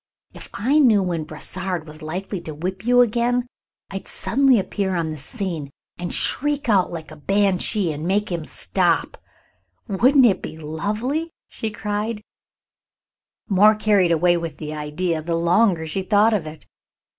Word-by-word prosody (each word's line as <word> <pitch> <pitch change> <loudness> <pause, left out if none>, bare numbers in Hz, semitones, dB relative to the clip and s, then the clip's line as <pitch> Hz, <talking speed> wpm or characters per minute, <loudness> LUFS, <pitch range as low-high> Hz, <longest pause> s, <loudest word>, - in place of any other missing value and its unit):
If - - -11
I 275 +8 +2
knew 225 -9 +5
when 170 -4 -2
Brossard 180 +2 -3
was 155 0 -12
likely 180 +4 -5
to 155 -3 -7
whip 185 +7 -5
you 245 0 +6
again, 245 +1 +1 0.5
I'd 195 -1 -6
suddenly 265 0 +3
appear 190 -1 -1
on 165 -2 -1
the 155 - -6
scene 170 - -3 0.3
and 175 0 -4
shriek 295 0 0
out 195 -5 +3
like 160 -2 -7
a - - -9
banshee 195 +2 +1
and 155 +2 -5
make 205 +1 0
him 170 -2 -2
stop. - - 0 0.7
Wouldn't 255 +7 +4
it 205 -5 +3
be - - -7
lovely?" 210 - -3 0.2
she 220 - -4
cried, 210 +1 -3 1.2
more 210 +2 +5
carried 205 -5 +3
away 175 +2 +3
with 165 -3 -5
the 155 -1 -6
idea 155 +2 -2
the 165 +1 -2
longer 170 +1 +2
she 160 +5 -3
thought 210 +3 +3
of 185 -7 -1
it. 155 +1 -10
190 Hz, 155 wpm, -22 LUFS, 165-215 Hz, 1.2 s, you